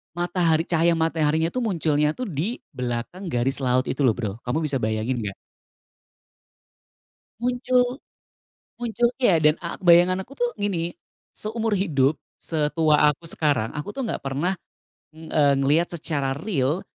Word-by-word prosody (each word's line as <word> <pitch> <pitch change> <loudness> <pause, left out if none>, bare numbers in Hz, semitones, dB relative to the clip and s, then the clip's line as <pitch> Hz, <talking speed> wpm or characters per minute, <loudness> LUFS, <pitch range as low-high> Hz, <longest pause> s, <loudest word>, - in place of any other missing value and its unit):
matahari, 175 -2 +1
cahaya 170 0 +2
mataharinya 160 0 +1
itu 255 - -2
munculnya 155 -8 +1
tuh 255 - -4
di 180 - -3
belakang 125 +9 -4
garis 135 0 +1
laut 130 0 +2
itu 135 - -3
loh 115 - +3
Bro, 110 -5 -3
kamu 155 +6 -1
bisa 140 -2 +1
bayangin 110 +3 -1
enggak? 105 -3 -4 2.1
Muncul. 250 +1 +1 0.8
Munculnya 240 -4 +2
dan 150 0 +5
a 170 - -4
bayangan 180 +1 +5
aku 275 - -14
tuh 240 0 +1
gini, 175 -4 -2 0.4
seumur 220 0 -2
hidup 155 -7 +2 0.2
setua 150 -1 +2
aku 165 +3 -8
sekarang, 145 -9 +1
aku 150 +7 -5
tuh 260 +1 -4
enggak - - -4
pernah, 145 +8 -1 0.6
eee, 155 -3 +1
ngelihat 150 +6 +2
secara 140 -4 -2
real 150 -1 -1
160 Hz, 135 wpm, -24 LUFS, 140-190 Hz, 2.1 s, dan